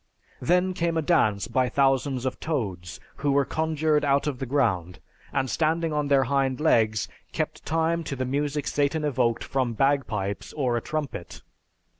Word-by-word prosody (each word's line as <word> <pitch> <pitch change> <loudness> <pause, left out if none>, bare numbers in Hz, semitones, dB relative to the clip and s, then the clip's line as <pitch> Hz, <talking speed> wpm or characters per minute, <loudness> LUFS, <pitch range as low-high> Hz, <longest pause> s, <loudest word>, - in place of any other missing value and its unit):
Then 180 +2 +2
came 170 -1 0
a 160 - +1
dance 110 - +2
by 125 +1 +1
thousands 135 -1 +1
of 130 - -2
toads 95 - -3 0.2
who 145 0 0
were 140 0 +3
conjured 155 -1 +1
out 140 0 +2
of 140 -4 -2
the 135 - -3
ground 100 -11 0 0.3
and 135 -1 0
standing 160 +3 0
on 150 -1 0
their 140 -1 +4
hind 135 0 0
legs 110 -8 +2 0.3
kept - - -3
time 165 +1 +1
to 140 - -3
the 130 0 -2
music 145 +2 -1
Satan 145 +2 0
evoked 125 -5 +1
from 130 -3 -1
bagpipes 115 -7 0
or 130 -5 0
a 120 - 0
trumpet. 145 - -5
140 Hz, 165 wpm, -26 LUFS, 125-155 Hz, 0.3 s, their